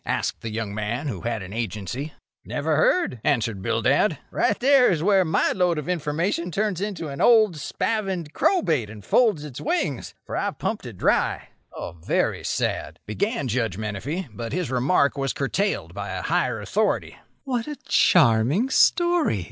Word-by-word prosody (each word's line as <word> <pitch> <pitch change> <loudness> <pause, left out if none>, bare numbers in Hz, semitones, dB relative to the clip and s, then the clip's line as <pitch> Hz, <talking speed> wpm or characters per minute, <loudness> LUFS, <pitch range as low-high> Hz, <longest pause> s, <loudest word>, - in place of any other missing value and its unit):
asked - - -2
the 115 - -4
young 110 -2 -3
man 110 +7 -3
who 100 -10 -4
had 115 -4 -3
an 95 +2 -9
Agency. 115 - -4 0.3
"Never 155 +1 -1
heard," 155 - +2
answered 115 -7 0
Bildad. 125 - +2
"Right 205 - +1
there 265 0 +5
is 165 -4 0
where 195 -1 +4
my 160 - +1
lode 180 -3 +1
of 150 - -4
information 170 +1 -1
turns 200 0 -1
to 200 -6 -3
an 140 - -5
old 220 -6 +5
spavined 190 -1 -2
crowbait, 160 - +1
and 105 -2 -11
folds 215 - +3
its 140 -4 -8
wings, 185 - -2
for - - -5
I've - - -2
pumped - - -3
it - - -9
dry." - - +1 0.3
"A - - -6
very 85 -1 -1
sad—" - - -2
began 200 - -2
Judge 115 -5 -1
Menefee, 110 - -4
but 115 +2 -6
his 180 -7 -2
remark 140 +3 +2
was 135 -2 -1
curtailed 195 +9 -1
by - - -5
a - - -4
higher - - 0
authority. - - -1 0.3
"What 250 -3 -2
a 300 - -4
charming 145 - +4
story!" 345 - +3
150 Hz, 165 wpm, -24 LUFS, -, 0.3 s, there